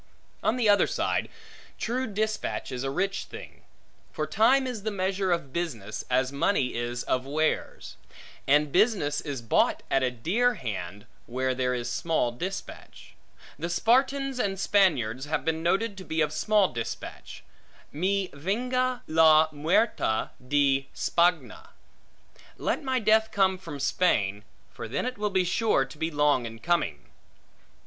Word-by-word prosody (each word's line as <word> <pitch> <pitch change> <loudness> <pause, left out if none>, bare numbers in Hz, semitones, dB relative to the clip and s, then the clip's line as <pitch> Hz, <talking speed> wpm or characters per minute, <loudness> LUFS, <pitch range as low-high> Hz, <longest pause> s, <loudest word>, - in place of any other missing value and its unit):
On 220 - +1
the 245 -3 +1
other 205 -1 +5
side, - - -1 0.5
true 255 +3 -2
dispatch 215 -6 -2
is 125 0 -4
a 135 - -1
rich 195 +7 -1
thing. - - -11 0.5
For - - -2
time 260 +5 +3
is 245 -5 -4
the 220 - -2
measure 190 -1 -1
of 160 -6 -2
business, 115 - -4
as 130 +1 +1
money 140 -2 +1
is 120 +1 -3
of 130 +1 -1
wares; 155 +2 -2 0.5
and 145 +1 +3
business 185 - +2
is 135 -5 -5
bought 115 - +2
at 135 - +3
a 130 - +2
dear 200 - +1
hand, 105 -4 -6 0.2
where 130 +2 -1
there 125 0 0
is 120 -1 -3
small 120 +1 0
dispatch. 185 +11 -7 0.5
The 170 +3 -3
Spartans 265 +7 +1
and 195 -4 -1
Spaniards 140 - +2
have 155 +1 -2
been 160 0 0
noted 195 +6 0
to - - -8
be 160 -2 -3
of 150 0 0
small 205 +4 +2
dispatch; 115 -2 -7 0.5
Mi 190 +5 -1
venga 250 - -1
la 160 -1 +5
muerte 150 - +1 0.2
de 135 -1 +2
Spagna; 175 0 0 0.9
Let - - -1
my 260 -1 0
death 220 -1 +3
come 190 -2 +2
from 165 -6 -8
Spain; 105 - +1 0.3
for - - -7
then 125 - -2
it 250 -3 -4
will 210 0 0
be 190 -2 +1
sure 180 - +2
to 135 +3 -13
be 160 - 0
long 145 -5 +2
in 115 0 -9
coming. 110 - -1
165 Hz, 150 wpm, -27 LUFS, 130-205 Hz, 0.9 s, other